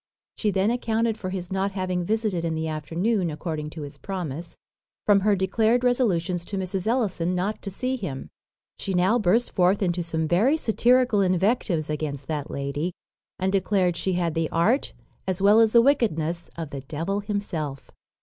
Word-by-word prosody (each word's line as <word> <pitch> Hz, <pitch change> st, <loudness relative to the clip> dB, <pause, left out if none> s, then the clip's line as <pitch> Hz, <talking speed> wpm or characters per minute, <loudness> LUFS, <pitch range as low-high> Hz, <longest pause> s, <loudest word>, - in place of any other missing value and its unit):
She 215 Hz, -, 0 dB
then 195 Hz, +2 st, +2 dB
accounted 230 Hz, -2 st, 0 dB
for 195 Hz, -4 st, -5 dB
his 185 Hz, -1 st, -5 dB
not 195 Hz, +1 st, -1 dB
having 185 Hz, -2 st, -1 dB
visited 215 Hz, -3 st, 0 dB
in 165 Hz, -1 st, -1 dB
the 160 Hz, 0 st, -2 dB
afternoon, 170 Hz, +6 st, -1 dB
according 155 Hz, -1 st, -4 dB
to 155 Hz, -1 st, -7 dB
his 145 Hz, -, -9 dB
promise, 170 Hz, -4 st, -5 dB, 0.5 s
from 205 Hz, -1 st, +5 dB
her 205 Hz, +1 st, +3 dB
declared 220 Hz, +6 st, +2 dB
resolutions 185 Hz, -9 st, +1 dB
to 200 Hz, -, -4 dB
Mrs. 190 Hz, +1 st, -2 dB
Ellison 185 Hz, -7 st, 0 dB
not 195 Hz, +4 st, -2 dB
to 200 Hz, -, -4 dB
see 255 Hz, +7 st, -2 dB
him. 145 Hz, -, -5 dB, 0.5 s
She 195 Hz, -, -2 dB
now 190 Hz, +7 st, +3 dB
burst 220 Hz, +4 st, +2 dB
forth 185 Hz, +2 st, +2 dB
into 175 Hz, -1 st, 0 dB
some 160 Hz, -1 st, -1 dB
very 220 Hz, -, +3 dB
satirical 245 Hz, -3 st, +3 dB
invectives 185 Hz, -3 st, +1 dB
against 150 Hz, -3 st, -3 dB
that 150 Hz, -1 st, -3 dB
lady, 140 Hz, +5 st, -3 dB, 0.4 s
and 190 Hz, +1 st, 0 dB
declared 190 Hz, -2 st, +1 dB
she 190 Hz, +2 st, -1 dB
had 175 Hz, -2 st, 0 dB
the 165 Hz, -1 st, -1 dB
art, 215 Hz, +12 st, +1 dB, 0.3 s
as 185 Hz, -1 st, -1 dB
well 205 Hz, +3 st, +6 dB
as 225 Hz, -1 st, +5 dB
the 235 Hz, 0 st, +6 dB
wickedness, 170 Hz, -, +1 dB
of 160 Hz, -3 st, -5 dB
the 140 Hz, -, -5 dB
devil 165 Hz, +9 st, -3 dB
himself. 180 Hz, -9 st, -4 dB
185 Hz, 175 wpm, -25 LUFS, 165-215 Hz, 0.5 s, well